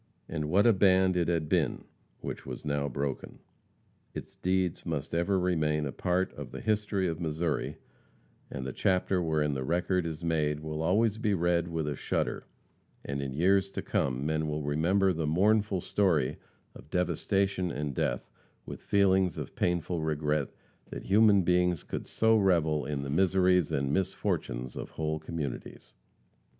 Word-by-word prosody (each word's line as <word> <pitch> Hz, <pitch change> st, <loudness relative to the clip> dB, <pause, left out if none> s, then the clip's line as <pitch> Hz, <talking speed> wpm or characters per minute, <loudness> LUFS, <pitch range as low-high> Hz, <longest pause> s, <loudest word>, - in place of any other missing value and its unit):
And 75 Hz, -2 st, -3 dB
what 100 Hz, +5 st, +4 dB
a 115 Hz, -, +6 dB
band 95 Hz, -1 st, +4 dB
it 85 Hz, -2 st, +1 dB
had 85 Hz, -3 st, 0 dB
been, 80 Hz, -5 st, 0 dB, 0.4 s
which -, -, -5 dB
was -, -, -7 dB
now 70 Hz, -1 st, -1 dB
broken! 70 Hz, +1 st, -4 dB, 0.8 s
Its -, -, -7 dB
deeds 90 Hz, -2 st, 0 dB
must 80 Hz, -4 st, -4 dB
ever 85 Hz, +3 st, +1 dB
remain 75 Hz, -4 st, +1 dB
a 70 Hz, -, -3 dB
part 90 Hz, +7 st, 0 dB
of -, -, -8 dB
the -, -, -7 dB
history 105 Hz, -3 st, 0 dB
of 80 Hz, 0 st, -3 dB
Missouri, 80 Hz, -2 st, -2 dB, 0.7 s
and 65 Hz, -, -5 dB
the 65 Hz, -, -4 dB
chapter 95 Hz, 0 st, +1 dB
wherein 75 Hz, -3 st, +1 dB
the 65 Hz, -1 st, -2 dB
record 90 Hz, +3 st, 0 dB
is 80 Hz, 0 st, -6 dB
made 75 Hz, -3 st, 0 dB
will 80 Hz, 0 st, -4 dB
always 105 Hz, +6 st, +2 dB
be 105 Hz, -4 st, +1 dB
read 85 Hz, -1 st, +1 dB
with 80 Hz, -3 st, -2 dB
a 75 Hz, -, -2 dB
shudder, -, -, -2 dB, 0.6 s
and 70 Hz, 0 st, -3 dB
in 70 Hz, -1 st, -4 dB
years 95 Hz, +4 st, +3 dB
to -, -, -4 dB
come 65 Hz, +1 st, -1 dB
men 80 Hz, 0 st, 0 dB
will 75 Hz, 0 st, -2 dB
remember 90 Hz, +7 st, +2 dB
the 80 Hz, -2 st, -2 dB
mournful 100 Hz, +3 st, +2 dB
story 85 Hz, -11 st, +1 dB, 0.4 s
of -, -, -14 dB
devastation 95 Hz, +1 st, 0 dB
and 75 Hz, -2 st, -3 dB
death -, -, -1 dB, 0.4 s
with -, -, -8 dB
feelings 95 Hz, -2 st, +2 dB
of -, -, -6 dB
painful 85 Hz, -1 st, 0 dB
regret 75 Hz, -2 st, 0 dB, 0.4 s
that -, -, -7 dB
human 100 Hz, -1 st, +5 dB
beings 90 Hz, -1 st, +2 dB
could -, -, -5 dB
so 110 Hz, 0 st, +3 dB
revel 80 Hz, -, +2 dB
in 70 Hz, -2 st, -3 dB
the 70 Hz, -, -4 dB
miseries 90 Hz, 0 st, +3 dB
and 70 Hz, +1 st, 0 dB
misfortunes 85 Hz, -9 st, -2 dB
of -, -, -6 dB
whole 80 Hz, 0 st, -1 dB
communities. 80 Hz, -4 st, -6 dB
85 Hz, 160 wpm, -29 LUFS, 75-95 Hz, 0.8 s, a